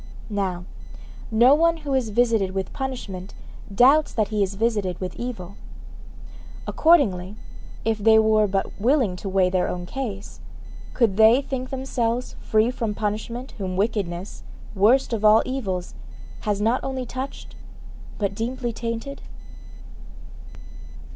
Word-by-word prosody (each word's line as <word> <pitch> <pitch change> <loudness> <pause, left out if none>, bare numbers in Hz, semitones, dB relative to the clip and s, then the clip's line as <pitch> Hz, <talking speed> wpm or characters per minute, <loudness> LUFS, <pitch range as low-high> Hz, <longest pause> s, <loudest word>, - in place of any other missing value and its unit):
Now, 185 -3 -2 0.6
no 235 +4 +5
one 330 +2 +3
who 280 - -1
is 255 -4 +1
visited 215 -4 +1
with 190 -1 -3
punishment 230 -9 -5 0.4
doubts 270 +9 +5
that 215 -3 0
he 215 -1 -1
is 195 0 0
visited 205 -4 -1
with 185 -1 -5
evil. 200 -6 -6 1.1
Accordingly, 210 - +3 0.5
if 225 -1 0
they 220 +1 +5
were 215 -1 +4
but 195 +1 -3
willing 245 -5 +2
to 195 - -5
weigh 190 -1 +2
their 185 -1 +1
own 175 0 -4
case, 205 -2 -6 0.6
could 220 -6 +2
they 220 +3 +7
think 265 -2 -4
themselves 250 -2 -2
free 220 +2 +2
from 225 -4 -3
punishment 220 +5 -4
whom 185 -2 -3
wickedness, 195 -3 -2 0.3
worst 230 +6 +3
of 220 -2 -2
all 215 +1 +6
evils, 195 -9 -3 0.6
has 205 -1 +1
not 225 +4 +1
only 265 -1 -3
touched, 260 +3 -7 0.6
but 200 -2 -1
deeply 240 +3 -3
tainted? 230 +4 -5
220 Hz, 130 wpm, -23 LUFS, 195-250 Hz, 1.1 s, they